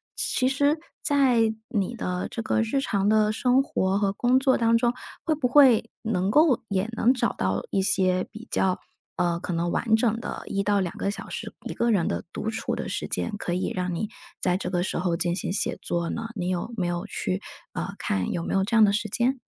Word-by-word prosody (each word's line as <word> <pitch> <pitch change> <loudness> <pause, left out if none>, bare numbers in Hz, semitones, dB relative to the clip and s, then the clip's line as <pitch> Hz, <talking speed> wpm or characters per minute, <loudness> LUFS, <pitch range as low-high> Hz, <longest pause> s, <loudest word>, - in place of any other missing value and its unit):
其 255 - +1
实 285 +3 +2 0.2
在 250 -6 +3 0.2
你 215 -1 -1
的 180 -5 -3
这 230 - -3
个 225 0 +1
日 225 +5 0
常 200 -6 0
的 215 0 +4
生 250 +4 +3
活 195 -7 0
和 200 -2 +1
工 245 +5 +2
作 265 -1 +3
当 230 0 +3
中， 235 +1 +3 0.3
会 320 -3 +1
不 280 -4 0
会 250 -4 +5
能 200 -3 0
够 300 -3 +4
也 200 +1 -1
能 230 +2 +3
找 245 -2 0
到 95 +1 -1
一 195 - +1
些 185 -1 +2
比 220 +2 -10
较， 185 -1 +2 0.4
呃， 170 -1 0
可 175 - -4
能 170 +1 0
完 220 -1 +2
整 225 0 +1
的 235 - -6
1 200 0 -1
到 205 -1 +2
2 175 - -4
个 200 - -1
小 - - -8
时， - - -6
一 - - -4
个 235 0 +1
人 190 -6 +2 0.3
独 220 - -3
处 220 - -2
的 - - -4
时 - - -3
间， 230 - -2
可 175 - -3
以 180 - -1
让 180 -1 -2
你 210 +5 -2 0.3
在 180 -1 +2
这 185 - -4
个 180 -1 0
时 - - -2
候 175 -1 0
进 175 +1 0
行 185 - -2
写 200 - 0
作 170 -1 -1
呢？ 230 0 -3
你 180 -3 -2
有 185 +6 -2
没 190 -5 -1
有 175 0 -2
去， 95 0 -3 0.3
呃， - - -4
看 95 -2 -1
有 170 - -2
没 - - -3
有 195 0 +2
这 230 - -1
样 220 - +7
的 205 - +5
时 215 +2 -1
间？ 245 +6 0
210 Hz, 235 characters per minute, -26 LUFS, 185-235 Hz, 0.4 s, 样